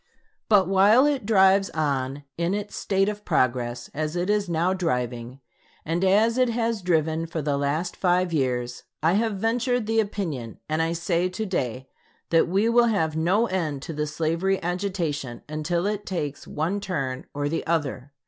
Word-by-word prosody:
But 200 -4 +5
while 200 +7 +5
it 280 -8 0
drives 195 -2 +5
on 140 -2 -1
in 170 +3 0
its 205 0 -5
state 195 0 +1
of 210 0 -4
progress 120 -4 0
as 155 +2 -3
it 180 +3 0
is 205 -3 0
now 170 +3 +1
driving, 125 -7 -3 0.4
and 165 +3 -1
as 215 +6 +3
it 255 -1 +4
has 230 -2 -1
driven 165 -2 0
for 165 0 -4
the 145 -1 0
last 145 +5 -1
five 180 -1 +1
years, 125 -4 -1 0.2
I 165 +2 +4
have 220 +1 +1
ventured 235 +3 0
the 225 +1 +1
opinion, 165 - -3
and 155 +1 0
I 165 +1 0
say 170 +2 0
to 220 +4 -4
day 130 - -3 0.4
that 165 0 +4
we 195 +5 +2
will 235 0 +4
have 160 -8 0
no 180 +8 +2
end 160 - -2
to 165 - -5
the 150 0 -2
slavery 165 +5 0
agitation 170 -9 -3
until 155 +4 -1
it 205 0 -2
takes 150 -6 -4
one 170 +7 -1
turn 140 -10 -3
or 145 0 -1
the 165 +3 -2
other. 145 -5 -1
170 Hz, 175 wpm, -25 LUFS, 150-200 Hz, 0.4 s, But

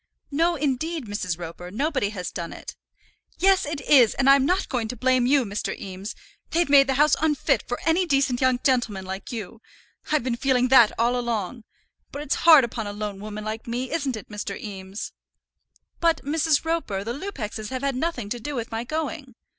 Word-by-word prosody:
"No, 335 +4 +2
indeed, 300 +1 -2
Mrs. 205 -5 -3
Roper, 175 +1 -8
nobody 260 - -1
has 180 -4 -5
done 170 -1 -5
it." - - -9 0.6
"Yes, 380 -4 +3
it 300 -1 -3
is; 255 -5 +5
and 270 - +1
I'm 275 0 +6
not 370 +3 +1
going 240 -4 -2
to 250 - -5
blame 255 +1 +2
you, 270 -1 +3
Mr. 205 0 -4
Eames. 190 +2 -7 0.3
They've 345 +1 +1
made 275 -1 +7
the 265 - +1
house 295 +2 +4
unfit 305 -3 +1
for 245 - -3
any 340 +3 +2
decent 275 -4 +1
young 255 -1 +3
gentleman 230 -8 +1
like 190 +5 -6
you. 225 -1 -7 0.5
I've 305 -5 +2
been 245 -2 -1
feeling 255 -1 +2
that 240 -4 +7
all 235 +2 +2
along; 235 -2 -3 0.5
but 285 - -5
it's 295 - 0 0.2
hard 310 -5 +10
upon 225 -2 -3
a 205 - -5
lone 205 -1 -5
woman 210 +1 -6
like 220 +2 -5
me, 245 +2 -3
isn't 280 -7 -1
it, 215 - -10
Mr. 205 -2 -5
Eames?" 195 -1 -7 0.9
"But, 335 -4 +1
Mrs. 310 +1 +1
Roper, 320 -13 -1
the 230 +3 -3
Lupexes 230 - -5
have 260 0 -4
had 275 -2 0
nothing 255 -6 -2
to 240 +2 -3
do 290 +5 -5
with 230 -2 -4
my 225 +1 -2
going." 290 -2 -4
250 Hz, 195 wpm, -24 LUFS, 215-290 Hz, 0.9 s, hard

